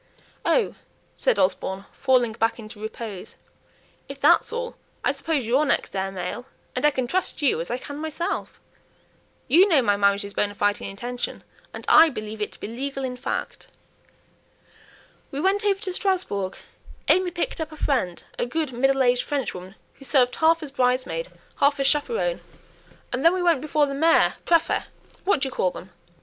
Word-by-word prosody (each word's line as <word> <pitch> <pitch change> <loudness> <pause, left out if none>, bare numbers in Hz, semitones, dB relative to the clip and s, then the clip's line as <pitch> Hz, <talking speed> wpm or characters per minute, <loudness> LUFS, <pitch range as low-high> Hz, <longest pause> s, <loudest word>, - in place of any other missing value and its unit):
"Oh!" 485 - +2 0.4
said - - +1
Osborne, 190 +1 0
falling 255 -4 +2
back 225 +1 0
into 215 -2 -10
repose, 220 -3 -7 0.7
"if - - -8
that's - - +4
all, 480 0 -4 0.3
I - - +3
suppose 280 -1 -1
you're 255 +6 +3
next 285 - 0
heir 195 0 -1
male, 190 +7 -5 0.3
and 250 - -2
I 295 - +7
can 260 -3 -2
trust 350 +2 -2
you 245 - +3
as 170 - -5
I 245 - -1
can 285 +3 -8
myself. 315 +2 -3 0.9
You 345 +10 +6
know 295 -7 +4
my 205 -2 +2
marriage 200 0 +2
is 200 - -8
bonë 205 0 -1
fide 205 0 +1
in - - -4
intention, 240 +5 -5 0.3
and - - -9
I 330 - +8
believe 215 -4 -6
it 210 - -2
to - - -13
be - - -5
legal 270 +4 -4
in 255 -1 -3
fact. 250 - -4 1.6
We 275 - -4
went 390 +5 +2
over 400 -2 +2
to 380 -3 -3
Strasbourg; 360 - -1 0.5
AimÄe 370 -1 +3
picked 340 - -2
up 320 0 -4
a 310 - -10
friend 215 -14 -1 0.2
a - - 0
good 305 +2 -2
middle 270 +2 +2
aged 245 0 +3
Frenchwoman 195 -9 -4 0.2
who 275 - -14
served 250 -2 +3
half 325 +1 +3
as 290 - -6
bridesmaid, 255 - 0 0.3
half 280 0 +3
as 275 - +1
chaperone, 455 - +1 0.7
and 255 +2 -1
then 335 +2 +6
we 365 - -1
went 335 -6 +3
before 305 0 +2
the 275 - -4
mayor 325 +4 +4
prÄfet 335 -1 +2 0.4
what 380 -8 +2
do 275 - +1
you - - -6
call 185 - +1
them? 185 +1 -10
270 Hz, 180 wpm, -24 LUFS, 220-320 Hz, 1.6 s, I